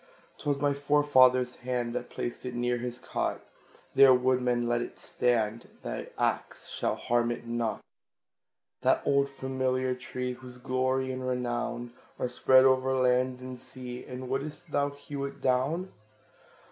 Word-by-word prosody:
'Twas 145 -2 0
my 145 0 +2
forefather's 130 -3 +4
hand 125 -1 -2
That 125 0 -4
placed 120 - -5
it 125 -1 -5
near 120 0 +1
his 120 0 -4
cot; 130 - -2 0.5
There, 135 -2 +8
woodman, 125 -1 +2
let 120 0 +1
it - - -6
stand, 115 -2 0 0.2
Thy - - -5
axe - - -1
shall - - -1
harm 120 0 +1
it 120 0 -4
not. 115 -1 -2 1.0
That - - +3
old 140 0 +3
familiar 130 -1 -1
tree, 125 0 -4
Whose 125 0 -11
glory 130 +1 0
and 130 0 -4
renown 120 -1 -2 0.2
Are - - -1
spread 130 +1 +5
o'er 130 0 +3
land 125 0 +2
and 130 -1 -7
sea 125 -1 -8
And 130 0 -7
wouldst 150 +5 -4
thou 145 0 +2
hew 140 0 -6
it 140 - -7
down? 140 +9 +1
130 Hz, 145 wpm, -29 LUFS, 125-130 Hz, 1.0 s, There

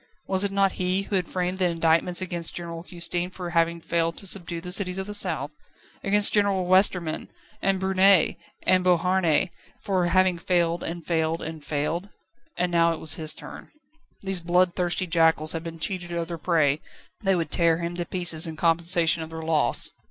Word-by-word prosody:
Was 190 0 +2
it 200 - +1
not 195 -1 +2
he 185 +2 0
who 200 - -4
had 180 -2 0
framed 180 0 -3
the 185 - +2
indictments 170 +1 +1
against 170 -2 -3
General 170 -1 -6
Custine 175 0 -3
for 180 -2 -7
having 170 0 +1
failed 165 0 -1
to - - -9
subdue 175 -3 0
the 180 +1 -7
cities 180 -1 0
of 190 - -3
the 210 - -6
south? 165 -8 -1 0.5
against 205 +1 +6
General 200 -3 +2
Westerman 180 -3 +2 0.3
and 195 -1 +1
Brunet 190 -1 +4 0.3
and 185 -1 +3
Beauharnais 180 -1 +2 0.3
for 185 -3 0
having 185 0 +2
failed 170 -1 0
and 170 0 -6
failed 160 -1 -1
and 160 -1 -7
failed? 160 +7 -3 0.5
And 180 0 -1
now 170 -1 +3
it 165 - -7
was 155 -1 +3
his 155 -1 -1
turn. - - -11 0.5
These 190 -2 -1
bloodthirsty 180 +1 +1
jackals 165 -2 +2
had 165 -1 -3
been 165 -1 -7
cheated 175 +1 -4
of 170 -1 -3
their 170 -1 -5
prey; 155 -3 +1 0.4
they 195 -1 +2
would 165 -4 -3
tear 165 -1 +3
him 170 0 -4
to 175 - -2
pieces 175 -3 +2
in 160 - -6
compensation 165 0 +2
of 160 - -7
their 160 0 -7
loss. 160 -2 +2
175 Hz, 185 wpm, -25 LUFS, 165-185 Hz, 0.5 s, against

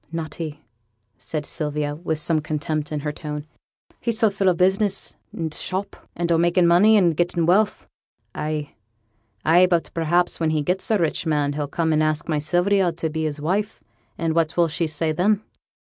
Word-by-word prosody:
'Not 165 -1 -4
he,' 155 -3 -6 0.6
said 150 -2 -2
Sylvia, 150 -1 -2
with 160 0 -3
some 155 +1 +1
contempt 155 0 -3
in 150 -1 -2
her 150 0 -2
tone. 150 -1 -6 0.5
'He's 230 -2 -1
so 220 -3 +3
full 195 -1 +2
o' 180 - +2
business 195 +3 +1 0.2
and 160 -2 -4
t' - - -8
shop, 190 +2 -3 0.2
and 170 0 -1
o' 165 - +4
makin' 175 +1 +3
money, 195 +6 +6
and 175 -5 +3
gettin' 175 0 +1
wealth.' 200 +5 +2 0.5
'Ay, 150 -1 -4 0.7
ay; 175 +3 +6
but 170 -2 0
perhaps 175 +2 +1
when 165 -1 +1
he 155 -1 0
gets 180 +5 -1
a 220 - +3
rich 165 -1 -1
man 145 -2 +1
he'll 145 0 -3
come 160 +2 0
and 155 - +2
ask 155 0 0
my 155 -3 0
Sylvia 175 +4 +2
to 165 -1 -4
be 160 0 -2
his 150 -1 -3
wife, 200 +8 -1 0.4
and 165 -1 0
what 165 0 0
will 170 -1 +4
she 160 +1 -1
say 155 +1 -1
then?' 200 +6 +1
165 Hz, 195 wpm, -23 LUFS, 155-180 Hz, 0.7 s, money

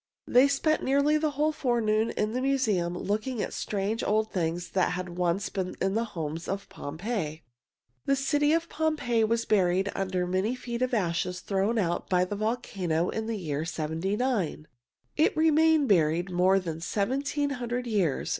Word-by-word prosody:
They 255 +3 +5
spent 295 +3 +1
nearly 280 +3 +3
the 310 0 +1
whole 305 +1 +2
forenoon 230 -6 +1
in 210 0 -1
the 255 - -1
museum 215 -11 +1
looking 215 +6 -2
at - - -2
strange, 205 +2 -2
old 215 +1 +1
things 175 -1 -2
that 185 -2 +1
had 180 0 -4
once 175 +2 -1
been 185 -2 -3
in 190 +1 0
the 225 +2 0
homes 160 +1 -4
of 195 +1 -3
Pompeii. 160 0 -4 0.6
The 275 - +4
city 290 +2 +2
of 330 +1 +1
Pompeii 300 -9 0
was 230 +1 +1
buried 190 -1 +2
under 185 -2 -1
many 190 +7 0
feet 240 -1 -5
of 255 -1 +1
ashes 180 -2 -1
thrown 200 +4 0
out 175 -5 -1
by 180 -1 +3
the 205 - -4
volcano 195 -6 -1
in 220 0 -3
the 225 -1 -2
year 155 -5 -3
seventy 165 +4 -2
nine. 210 - -1 0.5
It 310 - +3
remained 315 -1 +4
buried 175 -1 +2
more 185 +2 +4
than 165 -3 -5
seventeen 275 - -1
hundred 245 -1 -3
years. 195 - 0
210 Hz, 170 wpm, -28 LUFS, 180-250 Hz, 0.6 s, They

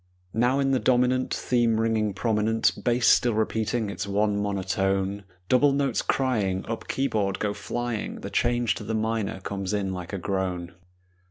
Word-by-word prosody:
Now 125 +4 +2
in 135 -1 +2
the 130 - +2
dominant 125 0 +2
Theme 120 -3 +1
ringing 110 -3 0
prominent, 110 0 +2
Bass 120 -1 +2
still 120 -3 +5
repeating 110 0 0
its 100 +2 -4
one 105 +1 +1
monotone, 95 0 -1 0.2
Double 135 +4 +4
notes 140 -1 +1
crying, 105 -8 0
Up 115 0 -5
keyboard 105 -8 0
go 105 -1 -1
flying, 120 +2 -4
The - - -6
change 120 -1 +1
to - - -6
the 110 - -2
minor 110 -3 -1
comes 100 +1 -3
in 95 -2 -1
like 90 -2 -6
a 100 - -3
groan. 90 -2 -3
110 Hz, 160 wpm, -26 LUFS, 100-120 Hz, 0.2 s, still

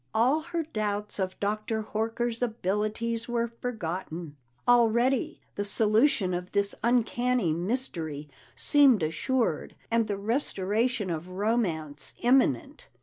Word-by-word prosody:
All 250 +7 +4
her 340 0 -3
doubts 210 -8 -2
of 185 -1 -2
Dr. 215 +2 -1
Horker's 225 +2 -2
abilities 225 +1 -1
were 235 -1 0
forgotten; 180 -9 -5 0.3
already 240 +2 +3
the 205 - -2
solution 215 -1 +3
of 180 +1 -4
this 200 0 +2
uncanny 240 -4 +2
mystery 170 - -3 0.3
seemed 270 - +5
assured, 160 - -1 0.2
and 230 -1 +2
the 205 -1 -2
restoration 215 -1 0
of 165 +2 -4
romance 185 -7 -1
imminent. 270 +4 +1
220 Hz, 110 wpm, -28 LUFS, 185-240 Hz, 0.3 s, seemed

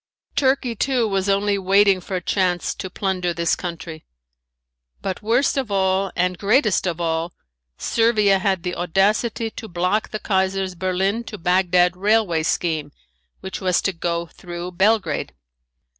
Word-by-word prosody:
Turkey 260 -3 +1
too 250 0 +1
was 195 -1 -1
only 200 0 +1
waiting 195 0 +4
for 190 - -5
a 180 - -2
chance 180 -3 0
to 190 - -6
plunder 185 -3 -2
this 170 0 +1
country. 165 -2 -7 1.0
But 190 -2 -4
worst 240 +7 +1
of 260 -5 -1
all 190 -1 +1
and 180 0 0
greatest 210 -2 +2
of 175 -1 -2
all, 165 0 -1 0.4
Servia 215 -4 +2
had 190 -3 0
the 180 - -2
audacity 210 +6 +1
to 220 - -8
block 180 +4 0
the 215 - -3
Kaiser's 190 -2 0
Berlin 190 +5 -1
to 210 - -7
Bagdad 180 0 +2
railway 200 -4 +2
scheme 155 -2 -1 0.5
which 190 +1 -6
was 185 -2 +2
to 195 - 0
go 170 0 -2
through 175 +1 -8
Belgrade. 190 -3 +1
190 Hz, 145 wpm, -22 LUFS, 175-210 Hz, 1.0 s, waiting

